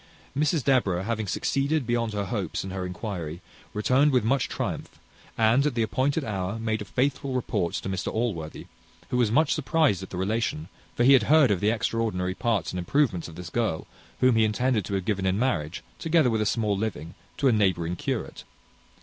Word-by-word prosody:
Mrs 150 +1 +1
Deborah 100 -10 +2
having 110 0 -2
succeeded 140 +8 0
beyond 115 -2 0
her 100 -1 -2
hopes 100 -3 -3
in 95 - -6
her 95 -1 -3
inquiry, 90 -4 -5 0.3
returned 130 +7 +3
with 125 -4 +3
much 130 +4 +1
triumph, - - -4 0.4
and, 115 +4 +4
at 145 -4 0
the 115 - +2
appointed 135 +8 0
hour, 100 -1 -3
made 110 -1 -2
a - - -5
faithful 135 +2 -1
report 90 -8 -1
to - - -4
Mr 95 0 -2
Allworthy, 95 -10 -3 0.5
who 125 - +1
was 120 -3 +3
much 150 +7 +3
surprized 155 - +2
at 95 - -8
the 90 - -6
relation; 100 -4 -1 0.3
for 120 - +2
he 135 +3 +7
had 125 -4 +4
heard 150 -6 +6
of 95 - +1
the 105 - +2
extraordinary 110 -5 -1
parts 110 -3 -1
and 90 - -4
improvements 95 - +1
of 85 - -11
this 90 -1 -8
girl, 110 -8 -1 0.4
whom 130 -2 +5
he 110 - +5
intended 110 -1 +1
to 100 - -2
have 95 -2 -2
given 95 -2 0
in 95 +1 +1
marriage, 95 - -1 0.2
together 160 -6 +3
with 110 -1 +1
a 105 - +1
small 105 -3 +1
living, 95 -6 -4 0.2
to 140 - +2
a - - +5
neighbouring 90 -6 +1
curate. - - -4
110 Hz, 200 wpm, -26 LUFS, 95-130 Hz, 0.5 s, he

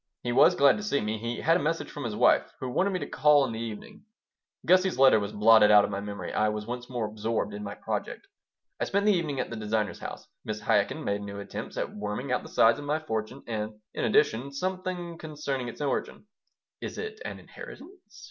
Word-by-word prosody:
He 120 - -1
was 120 - +6
glad 140 -1 +5
to 210 - -6
see 195 -9 +1
me. 110 +1 -2
He 115 +2 -4
had 165 +2 +4
a - - -3
message 165 +3 -2
from 145 - -6
his 110 -3 -3
wife, - - +3
who 130 - -4
wanted 190 +10 +2
me 190 - -1
to - - -5
call 145 0 +4
in 125 - -4
the 110 - -5
evening. 115 - -7 0.6
Gussie's 185 -1 +4
letter 130 -4 +6
was 100 0 -4
blotted 105 0 +6
out 105 -1 +7
of - - -5
my 100 - -2
memory. 100 0 -6
I 110 0 +2
was 105 0 -4
once 120 +1 -6
more 120 -3 -2
absorbed 110 0 -2
in 105 0 -6
my 100 0 -6
project - - -4 0.5
I - - 0
spent 200 +1 0
the 210 - +5
evening 155 -7 -1
at 125 - -3
the - - -4
designer's 110 -1 -2
house. - - -8 0.2
Mrs. 110 0 -4
Chaikin 100 -1 +1
made 100 0 -1
new 100 0 -6
attempts 100 - -7
at - - -3
worming 105 +5 -4
out 125 - +1
the - - -11
size 115 +5 +4
of 145 - -7
my 150 +2 +1
fortune 125 -3 -4
and, 110 -1 -3 0.2
in - - -3
addition, 125 +5 +2
something 180 +1 -4
concerning 145 -5 -4
its 120 - -8
origin 145 +7 -2 0.6
"Is - - -6
it 440 0 -6
an - - -6
inheritance?" - - -11
120 Hz, 225 wpm, -28 LUFS, 105-155 Hz, 0.6 s, out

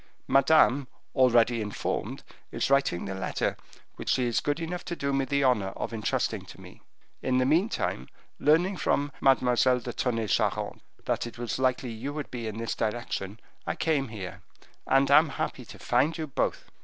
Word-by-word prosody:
Madame, 135 -1 +4 0.3
already 120 -3 +4
informed, 105 -1 -3 0.3
is - - -1
writing 140 -11 +2
the 95 - -4
letter 95 0 -2 0.4
which - - -5
she 130 - +2
is 120 -2 +1
good 145 +2 -1
enough 175 +2 -4
to 175 - -4
do 140 -3 -2
me 135 0 +1
the 140 +1 +1
honor 120 -7 +3
of - - -4
intrusting 110 -2 -1
to - - -13
me. - - -14 0.4
In 130 -1 +1
the 130 - +3
meantime, 170 - 0 0.3
learning 175 +6 +3
from 145 -3 0
Mademoiselle 125 -1 +4
de 120 0 -6
Tonnay 115 -3 -1
Charente - - 0 0.2
that - - -1
it 120 - -10
was 120 +1 -3
likely 130 -1 0
you 125 +6 -5
would 150 -2 -5
be 120 -3 -4
in 110 0 -5
this 115 0 -2
direction, 110 -2 -3 0.3
I - - -1
came 150 -4 0
here, 105 -5 -7 0.5
and 135 +1 +3
am 155 +2 +7
happy 130 -2 -4
to - - -12
find 140 +7 +1
you 160 - -3
both." 140 - -2
130 Hz, 180 wpm, -28 LUFS, 115-140 Hz, 0.5 s, am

